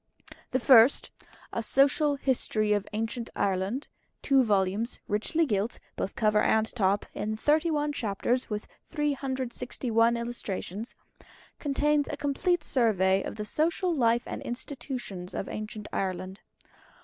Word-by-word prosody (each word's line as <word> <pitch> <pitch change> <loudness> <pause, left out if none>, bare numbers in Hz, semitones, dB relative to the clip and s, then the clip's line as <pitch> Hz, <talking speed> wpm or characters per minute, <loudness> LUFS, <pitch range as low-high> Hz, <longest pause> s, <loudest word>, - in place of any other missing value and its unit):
The 260 - +1
First 245 0 +6 0.4
"A 230 - -1
Social 280 +5 +3
History 225 -6 +1
of 205 -1 -1
Ancient 225 +2 -3
Ireland" 200 +7 -1 0.4
(2 270 -2 +4
vols., 205 +1 0
richly 265 +11 +1
gilt, 210 -2 -1 0.2
both 195 - -3
cover 215 -1 +3
and 220 0 +3
top, 200 -2 +2
in 215 +1 -3
31 300 +2 +1
chapters, 240 +2 -1
with 210 -1 -3 0.2
361 260 -5 0
Illustrations) 230 -2 -5 0.6
contains 295 0 +1
a - - -4
complete 315 +5 0
survey 195 -6 +3
of - - -5
the 210 -1 -4
Social 335 - 0
Life 235 -4 +2
and - - -5
Institutions 240 -7 -5
of - - -3
Ancient 215 0 -6
Ireland. 190 +1 -3
235 Hz, 125 wpm, -28 LUFS, 210-275 Hz, 0.6 s, First